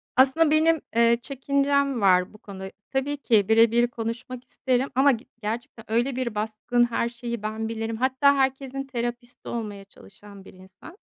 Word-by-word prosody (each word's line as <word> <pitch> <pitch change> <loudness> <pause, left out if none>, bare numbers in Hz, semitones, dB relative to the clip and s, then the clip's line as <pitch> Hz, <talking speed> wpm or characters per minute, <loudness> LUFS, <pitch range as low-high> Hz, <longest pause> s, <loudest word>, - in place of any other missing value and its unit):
Aslında 270 +5 +5
benim, 315 0 +3
eee, 235 0 +4
çekincem 280 -1 0
var 180 -1 +3
bu 215 - -14
konuda. 190 -2 -9 0.2
Tabii 280 +2 -1
ki 220 -7 +2
bire 225 0 +5
bir 240 +1 +3
konuşmak 240 +2 -6
isterim. 260 +1 -1
Ama 275 +2 +5
ge 235 0 -4 0.2
gerçekten 225 +1 -5
öyle 240 +3 +1
bir 245 -4 -3
baskın 220 +3 0
"Her 235 - 0
şeyi 235 -2 -6
ben 220 +1 -3
bilirim." 225 0 -3
Hatta 265 +3 +3
herkesin 270 0 -1
terapisti 240 -1 -5
olmaya 210 -4 -5
çalışan 200 0 -16
bir - - -14
insan. 190 - -15
240 Hz, 165 wpm, -25 LUFS, 220-270 Hz, 0.2 s, Aslında